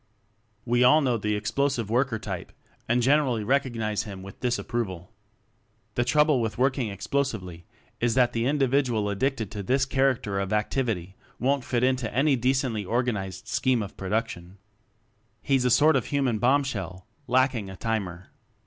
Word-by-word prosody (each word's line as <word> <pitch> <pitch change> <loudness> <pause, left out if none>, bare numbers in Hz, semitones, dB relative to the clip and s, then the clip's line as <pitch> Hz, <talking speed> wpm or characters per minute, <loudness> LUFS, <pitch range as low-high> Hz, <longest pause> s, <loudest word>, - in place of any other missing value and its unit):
We 120 +1 +2
all 150 +5 +6
know 125 -4 +1
the 105 0 -1
Explosive 110 +2 -1
Worker 125 -1 +1
type 100 -5 -6 0.4
and 120 +1 +2
generally 130 -4 +2
recognize 115 -4 0
him 100 -4 -8
with 95 0 -11
disapproval. 115 -7 -3 0.8
The 120 - +1
trouble 150 +1 +3
with 110 -1 -2
working 130 -2 +1
explo 120 +8 -1
sively 90 -10 -7 0.3
is 120 -1 +1
that 125 -2 +3
the 115 +1 0
individual 135 -6 +1
addicted 110 0 -1
to 105 - -5
this 130 +7 +1
character 130 -7 0
of 100 +1 -2
activity 105 -4 -1 0.2
won't 135 +1 +1
fit 120 -1 -1
into 130 -3 +1
any 135 +4 +3
decently 125 -3 0
organized 100 -4 -2
scheme 125 -2 +1
of 100 - -9
pro 95 - -6
duction. 105 -5 -2 0.9
He's 135 -3 +2
a - - +4
sort 155 +6 +5
of - - +1
human 135 -6 0
bomb 135 +5 +3
shell 95 -8 -5 0.2
lacking 125 -4 +1
a 95 - -8
timer. 95 -5 -3
120 Hz, 160 wpm, -26 LUFS, 105-130 Hz, 0.9 s, all